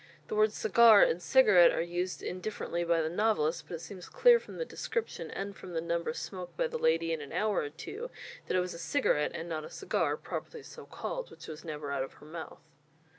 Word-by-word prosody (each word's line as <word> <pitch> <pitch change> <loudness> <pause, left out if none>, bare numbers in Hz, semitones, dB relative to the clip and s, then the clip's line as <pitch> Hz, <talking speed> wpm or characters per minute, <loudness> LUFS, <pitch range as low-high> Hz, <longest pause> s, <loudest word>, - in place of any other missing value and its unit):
The 440 - -2
words 430 0 +3
"cigar" 235 - +7
and 170 - +2
"cigarette" 210 -7 +6
are - - -1
used 175 +2 -3
indifferently 180 -2 -3
by 170 -1 +2
the - - -1
novelist, 170 -5 +1
but 170 - -5
it 165 - -8
seems 185 0 -9
clear 485 -1 +6
from - - -11
the 485 - -2
description 440 - -4
and 200 0 -5
from 180 - -10
the 165 - 0
number 170 +4 -1
smoked 185 -6 -7
by - - +2
the 480 0 -3
lady 165 - +2
in 160 - -3
an 145 - -9
hour 210 -2 +1
or 145 - -2
two, 420 - -7 0.4
that - - +1
it - - +3
was 180 0 -4
a 170 - -9
cigarette 165 - +1
and 165 - -5
not 160 -2 -3
a - - -8
cigar, 395 - -1
properly 465 -3 -6
so - - -11
called, - - -5
which - - -12
was 155 0 -8
never 150 -3 -5
out 140 -1 -1
of 135 - -5
her - - -16
mouth. 160 +1 -9
180 Hz, 230 wpm, -31 LUFS, 165-235 Hz, 0.4 s, cigar